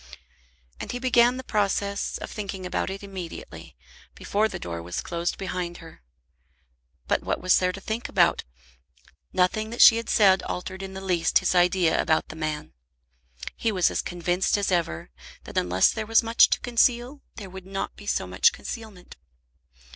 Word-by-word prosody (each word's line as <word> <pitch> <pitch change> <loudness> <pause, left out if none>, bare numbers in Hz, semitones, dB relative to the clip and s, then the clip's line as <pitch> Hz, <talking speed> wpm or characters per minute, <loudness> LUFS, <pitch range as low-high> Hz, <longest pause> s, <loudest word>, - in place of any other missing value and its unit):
And - - -5
he - - -2
began 245 -1 +3
the 260 - -6
process 200 -2 -1
of - - -8
thinking 195 -3 -6
about 180 - -2
it 195 +1 -7
immediately, 190 -4 -9 0.4
before 210 +2 0
the - - -6
door 85 -1 -6
was 85 +1 -5
closed 170 0 -3
behind 180 -2 -4
her. 165 - -14 1.1
But - - +1
what - - -2
was 185 0 +4
there 180 0 +1
to 195 - -8
think 220 +4 -4
about? - - +3 0.9
Nothing 195 +4 +1
that 235 - -7
she 225 - +9
had 230 - -5
said 190 -3 +5
altered 185 +1 -5
in 190 0 -7
the 190 - -6
least 180 -3 +2
his - - +1
idea 175 -1 +3
about 160 -1 +1
the - - -8
man. 155 - -4 0.8
He 225 - -1
was 185 -4 +2
as - - -1
convinced 175 +3 0
as 200 -1 -1
ever 125 - -1 0.3
that - - -11
unless 90 +1 +3
there 220 -1 -5
was 225 +1 +4
much 230 +1 +5
to - - +1
conceal 245 +3 +1
there 195 -4 -9
would 190 0 -10
not 195 0 -4
be - - -13
so - - 0
much 465 - +3
concealment. 220 - -9
190 Hz, 175 wpm, -25 LUFS, 175-220 Hz, 1.1 s, she